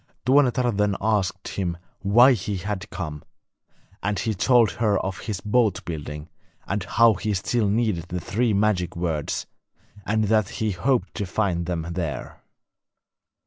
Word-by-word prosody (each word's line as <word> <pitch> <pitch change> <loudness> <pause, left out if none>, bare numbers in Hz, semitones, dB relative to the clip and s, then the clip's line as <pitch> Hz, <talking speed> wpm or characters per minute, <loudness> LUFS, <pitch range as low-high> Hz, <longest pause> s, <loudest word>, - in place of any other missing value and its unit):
Tuonetar 130 -2 +3
then 105 -1 +1
asked 100 -3 0
him 90 -3 -2 0.2
why 120 +7 +6
he 100 -2 -3
had 100 +2 -4
come, 75 -5 -6 0.8
and 105 +1 -1
he 110 - -1
told 120 +3 +4
her 105 -3 +1
of 95 -1 -4
his 100 0 -4
boat 105 -3 +1
building, 75 -2 -6 0.4
and 100 -1 -1
how 115 +3 +4
he 105 +2 -2
still 105 +3 0
needed 105 -6 0
the 90 +1 -3
three 115 +7 0
magic 100 -4 +1
words, 80 -4 -2 0.6
and 110 +4 +1
that 110 -1 +2
he 110 -1 0
hoped 120 +8 0
to 100 -4 -3
find 90 -4 -1
them 85 -3 -2
there. 85 -4 -4
100 Hz, 145 wpm, -24 LUFS, 90-110 Hz, 0.8 s, why